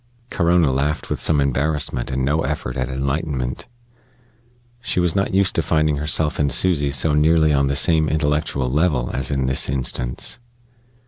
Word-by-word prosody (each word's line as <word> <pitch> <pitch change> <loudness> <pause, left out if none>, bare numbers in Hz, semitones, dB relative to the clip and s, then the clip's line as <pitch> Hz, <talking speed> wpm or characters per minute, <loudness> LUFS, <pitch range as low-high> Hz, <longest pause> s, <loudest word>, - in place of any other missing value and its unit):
Corona 85 -4 +2
laughed 70 +3 -2
with - - -1
some 75 - +2
embarrassment 70 -2 -1
and 65 0 -1
no 75 +4 +1
effort - - -3
at 65 -1 -2
enlightenment. 65 -1 -3 1.1
She 120 - -2
was 90 0 +1
not 95 -1 0
used 95 -1 +2
to - - +1
finding 75 -2 +1
herself 75 +1 -1
and 70 -2 +1
Susy 75 -1 +2
so 70 +2 +1
nearly 80 +1 +3
on 70 -1 +2
the 70 - -1
same 80 +1 +2
intellectual 75 -3 0
level 70 -2 0
as 65 +1 -1
in 65 -2 -1
this 65 0 +1
instance. 65 - -3
75 Hz, 165 wpm, -20 LUFS, 65-80 Hz, 1.1 s, nearly